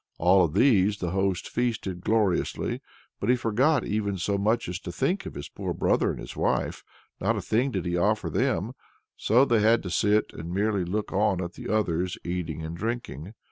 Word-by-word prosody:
All 90 +2 +5
of 80 -1 -1
these 105 -4 +4
the 90 -3 -3
host 95 -1 0
feasted 110 -7 -2
gloriously, 105 -4 0 0.4
but - - -2
he 125 - +6
forgot 125 +4 +2
even 100 -2 -1
so 100 +3 -1
much 110 +4 +1
as 90 +1 -4
to 90 - -7
think 180 - -1
of - - -8
his 70 - -6
poor - - -5
brother - - +2
and - - -4
his - - -8
wife; - - -1 0.4
not - - +1
a - - -2
thing 125 +5 +1
did 95 -9 -3
he 85 0 -1
offer 105 +5 +1
them; - - 0 0.6
they 120 0 +5
had 110 +2 +4
to 90 - -5
sit 105 +4 +2
and 85 +2 -7
merely 100 0 0
look 105 +4 -3
on 100 -1 +2
at 90 -1 -4
the - - -8
others 90 -4 0
eating 85 -3 -3
and 80 +1 -5
drinking. 110 - -4
100 Hz, 195 wpm, -26 LUFS, 90-110 Hz, 0.6 s, he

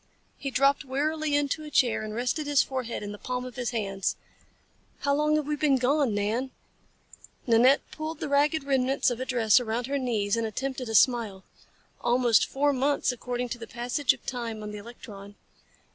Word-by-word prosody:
He 275 - -5
dropped 275 +1 +2
wearily 295 +3 -1
into 290 +2 0
a 305 - -8
chair 245 -6 +2
and 215 0 -5
rested 250 +6 -1
his 290 -2 +4
forehead 255 -5 -4
in 205 - -5
the 205 - -9
palms 250 0 -4
of 255 - -9
his 245 -2 -2
hands. 195 -5 -2 0.9
"How 280 - +1
long 300 +1 +2
have 305 -1 0
we 300 +1 -1
been 295 -2 +2
gone, 260 -2 +1
Nan?" 220 +6 -1 1.0
Nanette 245 +3 +5
pulled 310 0 -5
the - - -3
ragged 290 +2 +2
remnants 270 -1 +1
of 240 - -4
a 260 - -3
dress 235 -3 +4
around 235 0 -2
her 280 +2 -1
knees 220 -5 0
and 230 -1 -1
attempted 255 +2 -4
a 225 - -2
smile. 220 -6 +3 0.6
"Almost 240 -1 +3
four 285 +1 +1
months, 275 +1 +1
according 245 0 -4
to 240 - -5
the 230 - -8
passage 245 +3 0
of - - -7
time 230 -4 -4
on 210 - -6
the 210 - -7
electron." 205 -2 -11
250 Hz, 190 wpm, -27 LUFS, 230-280 Hz, 1.0 s, Nanette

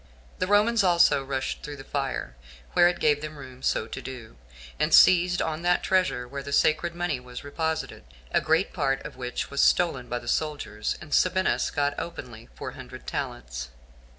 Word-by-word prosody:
The 185 - 0
Romans 210 +2 +4
also 170 -6 +4
rushed 135 -1 -3
through 145 -1 -7
the 135 - -10
fire, 135 - -3 0.4
where 175 - +6
it 175 0 -1
gave 150 -1 +3
them 155 0 -6
room 130 -2 -11
so 110 - 0
to 115 - -7
do, 125 -4 -9 0.4
and - - +1
seized 180 0 +6
on 160 0 -3
that 175 0 +2
treasure 180 -10 +1
where 140 +2 -6
the 140 +1 -7
sacred 155 +4 +2
money 175 -6 -1
was 125 0 -9
reposited; 160 +3 -3 0.3
a - - +3
great 160 +4 +1
part 135 -5 0
of - - -7
which 125 -1 -4
was 140 - +1
stolen 135 -8 +2
by 120 - -1
the 120 - -9
soldiers, 145 -8 -2
and 155 -2 -8
Sabinus 185 +1 +2
got 145 -1 0
openly 120 -9 -8
four - - -6
hundred - - -11
talents. - - -4
145 Hz, 180 wpm, -26 LUFS, 130-175 Hz, 0.4 s, where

